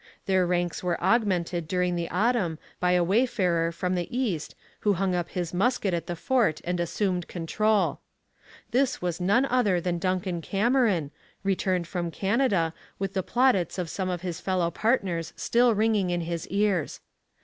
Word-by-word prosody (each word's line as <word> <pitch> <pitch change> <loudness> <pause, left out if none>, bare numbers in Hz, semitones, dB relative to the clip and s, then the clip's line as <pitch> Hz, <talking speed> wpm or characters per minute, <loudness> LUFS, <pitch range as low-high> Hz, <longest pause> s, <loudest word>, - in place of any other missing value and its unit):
Their 185 -2 +2
ranks 175 -1 -1
were 175 -2 0
augmented 180 -5 +1
during 180 0 0
the 170 -1 -2
autumn 200 -4 +1 0.2
by 180 0 +2
a 180 -1 +3
wayfarer 180 -5 +1
from 180 +2 -2
the 175 -2 -1
east 225 - -2 0.2
who 205 - +2
hung 190 0 0
up 175 -1 -1
his 175 -2 -3
musket 200 0 +1
at 170 -2 -2
the 175 - -3
fort 235 - +1
and 180 0 -2
assumed 180 0 -1
control. 210 +5 0 0.7
This 255 +1 +1
was 175 0 -3
none 205 +9 +3
other 240 -9 +2
than 175 0 -2
Duncan 185 -1 -1
Cameron, 205 - +1 0.3
returned 185 -2 0
from 175 -1 -3
Canada, 195 -3 +1 0.2
with 195 0 -3
the 190 - 0
plaudits 235 -6 +2
of 175 -3 -3
some 190 -2 -2
of 180 -2 -3
his 180 -2 -5
fellow 180 -3 0
partners 185 -6 0
still 240 -1 +3
ringing 210 -3 +2
in 175 0 0
his 170 -1 -4
ears. 200 -5 0
185 Hz, 165 wpm, -27 LUFS, 175-210 Hz, 0.7 s, a